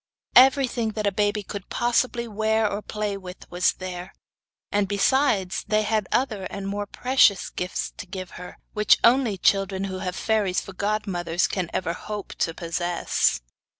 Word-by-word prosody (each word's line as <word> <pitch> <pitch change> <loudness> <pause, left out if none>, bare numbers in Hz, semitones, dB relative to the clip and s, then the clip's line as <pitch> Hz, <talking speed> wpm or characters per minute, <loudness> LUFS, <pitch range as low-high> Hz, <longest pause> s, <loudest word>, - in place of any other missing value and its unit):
Everything 255 -4 +5
that 215 -1 -2
a 200 - +3
baby 205 +1 0
could 200 0 -7
possibly 240 0 0
wear 220 0 +1
or 205 +1 -3
play 210 -1 -3
with 185 -2 -10
was 180 +1 +2
there, 185 0 -7 0.6
and 205 -1 +1
besides, 205 -1 +1
they 215 +1 +2
had 215 -2 0
other 215 -7 0
and 195 +1 -5
more 205 +1 -3
precious 250 -5 +3
gifts 180 +1 -3
to 205 - -8
give 185 -1 -7
her, 180 0 -10 0.2
which 210 0 +5
only 235 -4 +4
children 195 0 +1
who 190 -1 -4
have 185 -1 -3
fairies 210 -5 +1
for 195 - -9
godmothers 190 -4 -1
can 180 -4 -2
ever 170 -2 -1
hope 210 +2 -6
to 165 - +1
possess. 170 - 0
200 Hz, 160 wpm, -25 LUFS, 185-220 Hz, 0.6 s, Everything